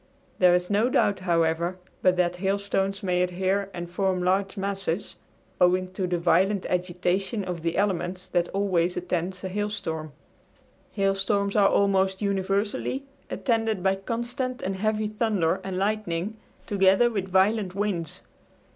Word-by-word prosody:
There 180 -1 +6
is 180 +2 -1
no 215 +5 +3
doubt, 200 -6 +2
however, 170 0 +1 0.2
but 185 -1 +3
that 180 0 +1
hailstones 195 +1 -1
may 180 -1 +1
adhere 190 +2 0
and 175 -2 -6
form 185 0 0
large 195 +2 +1
masses 195 -1 -3 0.5
owing 185 +1 +3
to 185 -1 -2
the 175 -1 0
violent 185 +3 +2
agitation 180 +3 -1
of 180 -3 -4
the 165 0 -1
elements 185 -2 -1
that 175 -1 +1
always 185 -3 0
attends 180 +1 -2
a - - -2
hailstorm. 185 -6 -3 0.8
Hailstorms 195 0 +1
are 200 -2 +5
almost 190 -1 +2
universally 200 +6 -1 0.3
attended 225 -5 0
by 190 0 +3
constant 240 +5 -3
and 190 +1 -2
heavy 215 +1 0
thunder 210 -6 0
and 190 -1 -4
lightning, 200 -1 -1 0.3
together 195 +4 +4
with 195 -4 -2
violent 190 +1 +2
winds. 195 -6 -2
190 Hz, 140 wpm, -26 LUFS, 180-200 Hz, 0.8 s, There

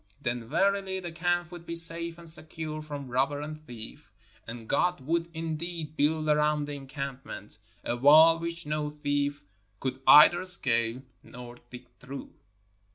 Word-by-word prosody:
Then, 120 -1 -3
verily, 195 +3 0
the 175 -2 -7
camp 175 +1 -1
would 175 -1 -10
be 170 0 -6
safe 170 0 +3
and 170 -1 -11
secure 155 -1 -1
from 145 -3 -7
robber 135 +3 0
and 155 +1 -8
thief, 115 -2 -11 0.4
and 115 0 -9
God 180 +6 +1
would 165 +5 -1
indeed 160 -1 -5
build 155 +1 0
around 150 0 +2
the 145 - -6
encampment 135 -6 -7 0.2
a 120 - -1
wall 155 +6 +6
which 170 0 -4
no 150 0 -2
thief 145 -1 -2 0.4
could 130 0 -4
either 165 +4 +8
scale 125 -8 +2 0.3
or 120 -1 -10
dig 125 - -11
through. 135 +2 -9
150 Hz, 150 wpm, -28 LUFS, 135-170 Hz, 0.4 s, either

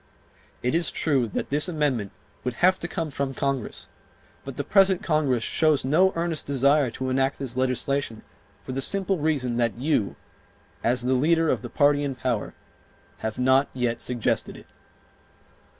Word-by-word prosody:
It 125 - 0
is 170 +1 +2
true 135 -7 0
that 110 - -4
this 150 +5 +2
amendment 140 - -1 0.3
would 125 -2 -3
have 185 +8 +3
to 175 - -3
come 165 -3 -4
from 135 -1 -3
Congress, 140 -4 -3 0.6
but 135 -2 -8
the 145 - -1
present 195 +1 +4
Congress 145 -7 +1
shows 155 0 +2
no 175 +8 +4
earnest 165 -2 -2
desire 140 0 +3
to 130 +2 -4
enact 135 +1 +1
this 130 -3 -5
legislation 130 -2 -1 0.4
for - - -7
the 135 +1 -2
simple 195 +2 +1
reason 140 -6 0
that 120 -2 0
you, 130 -6 0 0.7
as 120 +1 +2
the 130 +1 +1
leader 160 +5 +2
of - - -1
the - - -7
party 145 -1 +3
in 140 -2 -2
power, 125 -4 -2 0.6
have 110 -1 -4
not 130 +2 +3
yet 120 -2 -1
suggested 120 -3 -2
it. - - -14
135 Hz, 165 wpm, -25 LUFS, 125-155 Hz, 0.7 s, present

